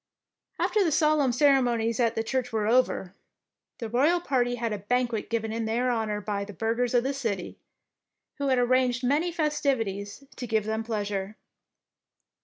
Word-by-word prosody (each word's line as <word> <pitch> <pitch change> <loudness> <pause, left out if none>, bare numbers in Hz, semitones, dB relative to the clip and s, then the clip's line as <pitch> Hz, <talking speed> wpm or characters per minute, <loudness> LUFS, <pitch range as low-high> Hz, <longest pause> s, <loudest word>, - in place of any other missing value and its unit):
After 425 -2 +2
the 335 - +1
solemn 305 -3 +3
ceremonies 245 -4 +2
at 230 -1 +2
the 225 - 0
church 250 +1 -2
were 220 -2 0
over, 220 -5 +1 0.6
the 230 - -5
royal 285 +10 +3
party 245 -7 0
had 230 -2 -2
a 205 - -4
banquet 235 +1 -1
given 225 -1 -2
in 225 0 -2
their 240 +3 0
honour 220 -3 -1
by 200 -1 -2
the 205 +1 -9
burghers 230 +4 -1
of 240 - +4
the 270 +2 -1
city, 225 -9 -4 0.8
who 280 - -1
had 260 -1 +3
arranged 250 0 +2
many 300 +7 +1
festivities 275 - -1
to 245 - -5
give 220 -2 0
them 220 +1 -2
pleasure. 205 -2 -3
240 Hz, 165 wpm, -27 LUFS, 220-260 Hz, 0.8 s, of